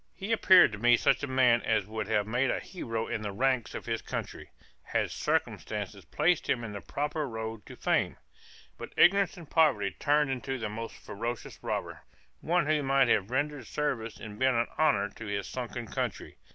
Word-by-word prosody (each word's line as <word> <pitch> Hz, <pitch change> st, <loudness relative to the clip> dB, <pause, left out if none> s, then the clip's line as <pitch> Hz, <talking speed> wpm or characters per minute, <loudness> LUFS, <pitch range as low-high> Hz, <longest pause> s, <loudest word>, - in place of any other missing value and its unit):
He 200 Hz, +3 st, -5 dB
appeared 185 Hz, -, +7 dB
to 105 Hz, -, -7 dB
me 120 Hz, +1 st, +5 dB
such 135 Hz, -, +2 dB
a 145 Hz, -, -2 dB
man 125 Hz, -3 st, +4 dB
as 110 Hz, -3 st, +1 dB
would 110 Hz, 0 st, -4 dB
have 105 Hz, -2 st, +1 dB
made 125 Hz, +5 st, +1 dB
a -, -, 0 dB
hero 115 Hz, -11 st, -4 dB
in 110 Hz, -, -3 dB
the 105 Hz, -1 st, -3 dB
ranks 130 Hz, +1 st, 0 dB
of -, -, -6 dB
his -, -, -2 dB
country, -, -, -6 dB, 0.3 s
had -, -, -1 dB
circumstances -, -, -2 dB
placed 175 Hz, -1 st, +1 dB
him 120 Hz, -, +1 dB
in 110 Hz, -, -5 dB
the 100 Hz, -, -6 dB
proper 150 Hz, 0 st, -3 dB
road 110 Hz, -1 st, -6 dB
to -, -, -10 dB
fame; -, -, 0 dB, 0.6 s
but -, -, -8 dB
ignorance 195 Hz, 0 st, +5 dB
and 170 Hz, -3 st, -10 dB
poverty 140 Hz, -, +3 dB
turned 145 Hz, -1 st, +1 dB
into 130 Hz, +1 st, -3 dB
the 110 Hz, -3 st, -3 dB
most 115 Hz, +2 st, -6 dB
ferocious 115 Hz, +3 st, -6 dB
robber, -, -, -4 dB, 0.4 s
one 175 Hz, -1 st, +1 dB
who 155 Hz, 0 st, +2 dB
might 135 Hz, -2 st, +3 dB
have 100 Hz, -2 st, +2 dB
rendered 145 Hz, +2 st, -2 dB
service 130 Hz, -7 st, -2 dB
and 105 Hz, -1 st, -9 dB
been 130 Hz, -1 st, +3 dB
an 115 Hz, 0 st, +2 dB
honor 105 Hz, -10 st, +3 dB
to 110 Hz, +2 st, -10 dB
his 100 Hz, -1 st, -2 dB
sunken 120 Hz, -1 st, -5 dB
country. -, -, -4 dB
125 Hz, 190 wpm, -29 LUFS, 110-145 Hz, 0.6 s, appeared